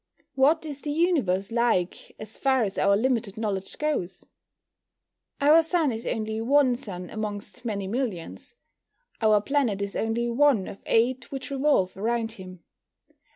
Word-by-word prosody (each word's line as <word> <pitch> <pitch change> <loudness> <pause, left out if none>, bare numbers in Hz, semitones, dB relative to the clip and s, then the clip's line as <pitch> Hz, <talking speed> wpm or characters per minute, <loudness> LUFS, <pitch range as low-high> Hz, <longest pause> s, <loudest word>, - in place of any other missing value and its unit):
What 275 +5 +3
is 285 -2 -6
the 295 - -3
Universe 280 - +1
like, 230 -7 0
as 215 0 -7
far 265 -3 +2
as 195 -2 -3
our 200 +1 +4
limited 230 -3 0
knowledge 200 -3 -3
goes? 290 - -2 1.1
Our 300 +3 +6
Sun 325 -3 +1
is 225 0 -5
only 220 0 -2
one 260 +1 +3
sun 185 -8 -8
amongst 210 -1 -6
many 200 -4 -2
millions. 215 - -4 0.7
Our 215 -1 +5
planet 240 -4 0
is 200 0 -4
only 225 +2 -1
one 240 -4 +3
of 195 - -9
eight 240 +2 +1
which 270 0 -6
revolve 270 -9 +2
around 225 +3 -1
him. 185 -5 -11
225 Hz, 145 wpm, -26 LUFS, 200-270 Hz, 1.1 s, Our